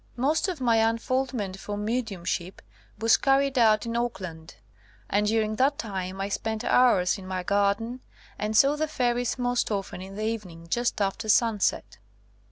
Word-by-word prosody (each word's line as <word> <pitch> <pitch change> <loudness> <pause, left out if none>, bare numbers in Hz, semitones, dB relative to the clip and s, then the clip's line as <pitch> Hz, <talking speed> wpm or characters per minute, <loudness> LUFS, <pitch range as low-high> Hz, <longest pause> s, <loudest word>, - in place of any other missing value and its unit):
Most 285 +9 +1
of 360 -5 -3
my 230 -3 +3
un 225 +1 +2
foldment 240 -6 -2
for 205 +1 -5
mediumship 205 -5 -3 0.3
was 225 0 +4
carried 275 0 +2
out 215 -1 +4
in 230 0 -3
Auckland, 185 -9 -4 0.5
and 210 +1 +1
during 215 0 0
that 275 +3 +2
time 190 -3 -5
I 195 - -1
spent 220 +2 -3
hours 200 -7 +3
in 185 - -10
my 185 -1 -3
garden, 205 +6 0 0.4
and 210 +1 0
saw 280 +2 +5
the 310 +1 -1
fairies 245 -4 0
most 245 -1 0
often 195 -3 -3
in 190 +1 -9
the 215 +1 -3
evening 190 -7 -5
just 240 -2 0
after 205 +3 -1
sun 225 -1 +3
set. - - -1
220 Hz, 170 wpm, -26 LUFS, 195-245 Hz, 0.5 s, saw